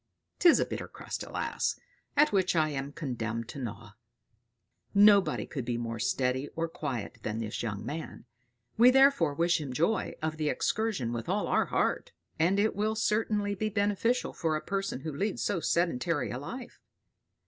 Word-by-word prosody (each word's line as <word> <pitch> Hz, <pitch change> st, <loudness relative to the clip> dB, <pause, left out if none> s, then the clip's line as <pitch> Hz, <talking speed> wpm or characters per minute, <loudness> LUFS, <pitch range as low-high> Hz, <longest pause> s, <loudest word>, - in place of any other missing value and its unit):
'Tis 345 Hz, -3 st, +6 dB
a -, -, +2 dB
bitter -, -, -5 dB
crust, -, -, -7 dB
alas! -, -, -2 dB, 0.4 s
at 300 Hz, +1 st, +5 dB
which 190 Hz, -3 st, +2 dB
I 155 Hz, -2 st, +3 dB
am 140 Hz, -1 st, -4 dB
condemned 115 Hz, -7 st, -4 dB
to -, -, -7 dB
gnaw!" 110 Hz, -4 st, -6 dB, 1.0 s
Nobody 200 Hz, -1 st, +5 dB
could 135 Hz, -5 st, -5 dB
be 120 Hz, 0 st, -2 dB
more 115 Hz, -1 st, -4 dB
steady 125 Hz, +6 st, 0 dB
or 165 Hz, 0 st, -1 dB
quiet 130 Hz, -7 st, -5 dB
than 105 Hz, +1 st, -3 dB
this 110 Hz, -2 st, -3 dB
young 105 Hz, -3 st, -4 dB
man; 155 Hz, -4 st, -6 dB, 0.5 s
we 245 Hz, +2 st, +9 dB
therefore 265 Hz, -, +5 dB
wish 170 Hz, +1 st, +2 dB
him 140 Hz, -3 st, -5 dB
joy 170 Hz, -, 0 dB
of 155 Hz, 0 st, -3 dB
the 155 Hz, -1 st, 0 dB
excursion 205 Hz, -, -1 dB
with 115 Hz, -1 st, -4 dB
all -, -, +1 dB
our -, -, +2 dB
heart; -, -, 0 dB, 0.3 s
and 180 Hz, +5 st, +3 dB
it 215 Hz, +2 st, +2 dB
will 215 Hz, +2 st, 0 dB
certainly 210 Hz, -1 st, +1 dB
be 215 Hz, +2 st, -2 dB
beneficial 210 Hz, +4 st, 0 dB
for 160 Hz, -2 st, -1 dB
a 155 Hz, -, -4 dB
person 195 Hz, -8 st, -2 dB
who 155 Hz, 0 st, -5 dB
leads 200 Hz, +7 st, -1 dB
so 200 Hz, -, 0 dB
sedentary 165 Hz, -4 st, 0 dB
a 125 Hz, -, -4 dB
life. 240 Hz, -, -8 dB
160 Hz, 170 wpm, -30 LUFS, 125-205 Hz, 1.0 s, we